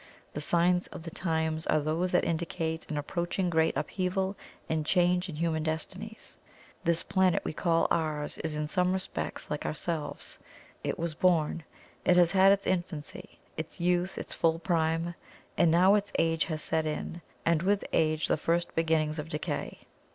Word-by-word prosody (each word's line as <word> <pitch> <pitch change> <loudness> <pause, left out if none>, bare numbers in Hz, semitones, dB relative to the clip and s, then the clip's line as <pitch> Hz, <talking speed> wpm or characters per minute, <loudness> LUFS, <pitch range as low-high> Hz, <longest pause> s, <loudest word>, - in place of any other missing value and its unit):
The 150 - -4
signs 175 +3 +2
of 180 - -9
the 165 - -7
times 160 -2 -1
are 155 - +3
those 160 +5 0
that 180 - +3
indicate 165 0 -2
an 155 - -2
approaching 175 +4 -1
great 160 -3 +2
upheaval 190 +5 -1 0.3
and 160 -1 0
change 180 +2 +2
in 160 - -5
human 160 0 0
destinies. 185 +8 -4 0.5
This 170 0 +2
planet 190 -2 +2
we - - -2
call 165 +1 +2
ours 155 -2 -1
is 160 -1 -2
in 150 0 -1
some 180 +4 +1
respects 190 -4 -4
like 150 - -2
ourselves: 155 -1 -3 0.4
it - - -2
was 170 -1 -2
born; 165 -1 +2 0.4
it 180 - +4
has 175 -1 +5
had 195 0 +6
its 200 0 +2
infancy, 175 -5 -3 0.2
its 160 +2 -6
youth, 180 +1 +1
its - - -5
full 165 0 +2
prime; 165 -1 0 0.4
and 170 - +4
now 180 +4 +6
its 205 0 +1
age 165 -1 +2
has 155 -4 -3
set 160 -1 0
in, 165 +2 -4 0.2
and 165 -1 +3
with 200 +2 +1
age 155 -1 +2
the - - +2
first 170 +3 0
beginnings 160 -1 +1
of 150 +2 -5
decay. 150 - -4
165 Hz, 170 wpm, -29 LUFS, 160-180 Hz, 0.5 s, had